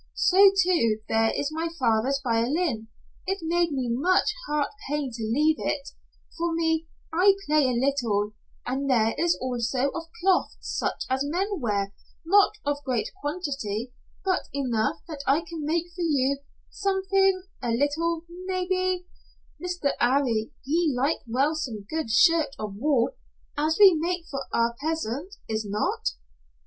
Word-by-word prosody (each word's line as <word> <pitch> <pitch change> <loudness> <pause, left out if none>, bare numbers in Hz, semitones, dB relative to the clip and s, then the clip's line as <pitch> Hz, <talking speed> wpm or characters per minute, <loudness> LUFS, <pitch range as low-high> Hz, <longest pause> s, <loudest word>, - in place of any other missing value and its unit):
So, 390 +1 +6
too, 230 -12 +2
there 225 0 +2
is 285 - -1
my 325 +2 -2
father's 250 +1 +2
violin. 240 +1 0 0.4
It 385 - 0
made 340 0 +1
me 260 -3 -1
much 355 +12 +2
heart 295 -1 0 0.2
pain 290 -3 -1
to 230 - -6
leave 295 +8 +2
it 285 -1 -2 0.5
for 335 0 -1
me, 320 -1 0 0.3
I 385 +4 +5
play 300 -1 +3
a 255 - +1
little, 235 -7 +1 0.3
and 270 +3 -2
there 225 -3 +3
is 340 +1 +2
also 255 +1 0
of 330 -1 -5
cloth 370 +1 +2
such - - -2
as 260 +1 0
men 370 +6 -1
wear 200 -5 -1 0.3
not 400 +5 +5
of 290 0 -1
great 255 -4 -1
quantity 275 - -3 0.3
but 370 -1 0
enough 275 +3 0
that 305 -4 -6
I 280 +4 +4
can 330 -2 -6
make 335 +3 -1
for 360 - -5
you 280 -4 +1 0.3
something 385 -1 +1 0.2
a 245 - -2
little 320 +7 0 0.2
maybe, 370 -1 0 0.6
Mr. 355 -6 0
'Arry 240 -4 +2
he 320 +3 +1
like 275 +6 +1
well 270 +7 +2
some 235 -10 -4
good 315 -3 -3
shirt 320 +5 +4
of 210 -2 -5
wool 255 +1 +2 0.4
as 310 +2 +1
we 395 -3 +9
make 340 +2 -1
for 275 -1 -3
our 235 0 +1
peasant 320 - -3
Is 220 0 -1
not?" 205 - -1
290 Hz, 150 wpm, -26 LUFS, 245-335 Hz, 0.6 s, we